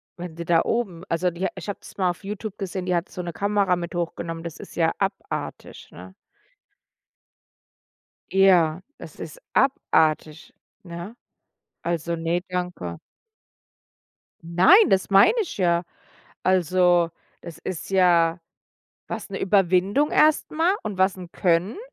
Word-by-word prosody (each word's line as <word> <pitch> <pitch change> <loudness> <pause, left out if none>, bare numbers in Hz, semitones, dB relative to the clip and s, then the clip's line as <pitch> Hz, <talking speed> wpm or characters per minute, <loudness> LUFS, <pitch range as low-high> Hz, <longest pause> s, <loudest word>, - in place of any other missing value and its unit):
wenn 175 -2 -8
die 170 - -5
da 165 -1 +4
oben 190 -8 -2
also 175 +2 0
die 185 +3 -2
ich 185 +1 -8
habe 200 - -4
das - - -14
mal 185 -2 +2
auf 175 - -12
Youtube 210 +1 -6
gesehen, 190 -2 -4
die 180 -1 0
hat 170 - -2
so 180 - -6
'ne 175 -1 -6
Kamera 200 -2 +1
mit 175 +1 -6
hochgenommen. 165 -1 -4
Das 165 - -6
ist - - -12
ja 165 -1 +2
abartig, 195 0 -5
ne? 90 +2 -12 2.2
Ja, 180 -3 +4 0.2
das - - -12
ist - - -8
abartig, 160 - +1 0.3
ne? 175 +5 -8 0.7
Also 170 0 -2
ne, 165 +2 -1
danke. 180 - -4 1.4
Nein, 185 - +5
das 190 +1 +2
meine 195 - +6
ich 360 - -6
ja. 170 -2 +2 0.6
Also 180 -1 +3 0.3
das 170 - -9
ist 180 - -6
ja 175 -3 +3 0.7
was, - - -5
'ne 195 - -5
Überwindung 195 - +2
erst 310 0 +3
mal 330 +5 +2
und 205 -3 -5
was 190 +1 +2
'n 180 -2 -10
Können. 180 - +1
180 Hz, 140 wpm, -24 LUFS, 170-195 Hz, 2.2 s, meine